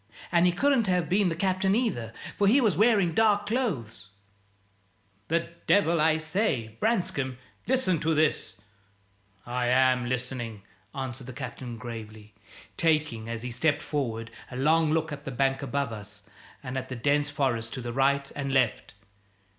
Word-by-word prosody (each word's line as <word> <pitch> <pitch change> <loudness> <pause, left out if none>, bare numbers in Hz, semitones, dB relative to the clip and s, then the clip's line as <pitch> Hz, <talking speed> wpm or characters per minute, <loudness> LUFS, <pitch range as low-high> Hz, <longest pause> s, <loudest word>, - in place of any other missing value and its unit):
"And 175 0 +4
he - - +4
couldn't 255 +3 +2
have 180 -3 +1
been 195 0 +3
the 165 - -2
Captain 190 +2 +1
either, 185 - -1 0.2
for 200 - +2
he 245 +8 +6
was 215 - +2
wearing 200 -4 +3
dark 210 0 +3
clothes 145 - -2 0.6
" 100 0 -39
"The 170 +1 0 0.2
devil! 170 -5 +4
I 160 0 +4
say, 155 - -1
Branscome, 145 - 0 0.3
listen 230 -10 +2
to 160 +1 +1
this 155 -9 +1 0.5
" 100 0 -39
"I 125 0 -1
am 125 -1 +3
listening," 120 -4 -4 0.3
answered 130 -2 -5
the 130 - -7
Captain, 125 -2 -7
gravely, 110 -3 -9 0.4
taking, 150 -9 +1
as 115 0 -4
he 125 - -4
stepped 145 +4 +1
forward, 115 -6 -3 0.2
a 125 - -7
long 155 +3 +3
look 160 0 0
at 150 - -6
the - - -5
bank 135 +1 0
above 140 -2 -2
us 105 -1 -9 0.4
and 130 0 -3
at 130 - -9
the 130 - -4
dense 145 +4 +1
forest 125 -6 -1
to 120 -2 -4
right 140 +2 +1
and 140 -1 -3
left. 130 -6 +1
135 Hz, 160 wpm, -27 LUFS, 120-170 Hz, 0.6 s, he